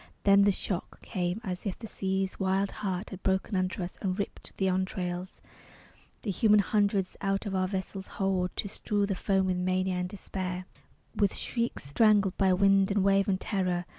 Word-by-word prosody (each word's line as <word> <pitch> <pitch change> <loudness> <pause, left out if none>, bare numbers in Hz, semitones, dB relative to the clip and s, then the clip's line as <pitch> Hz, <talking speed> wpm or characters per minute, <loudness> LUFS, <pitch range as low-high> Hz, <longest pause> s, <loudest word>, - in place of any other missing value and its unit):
Then 200 0 +6
the 205 - +5
shock 185 -1 -4
came, 180 +1 -2
as 185 -4 -4
if 190 - -3
the 230 - -8
sea's 190 -2 -2
wild 195 +1 +1
heart 190 -1 -2
Had 190 -1 -8
broken 190 +2 0
under 185 0 0
us, 175 - -7
and 185 -2 -1
ripped 200 - -5
the 190 - +1
entrails, 185 -1 -2 0.8
The 205 - -1
human 210 +2 +4
hundreds, 200 -2 +1
out 195 +1 0
of 200 - -3
our 185 -1 +1
vessel's 190 0 -4
hold, 190 -2 +1
To - - -2
strew 205 0 0
the 200 - -1
foam 195 0 +1
with 185 -1 0
mania 185 0 0
and 180 0 -2
despair, 185 -2 -5 0.5
With 200 -2 +2
shrieks 235 -1 -2
strangled 200 - +3
by 190 -1 +4
wind 195 +1 +4
and 200 -1 +2
wave 195 0 +3
and 190 -2 +1
terror. 180 -4 -1
190 Hz, 185 wpm, -29 LUFS, 185-200 Hz, 0.8 s, Then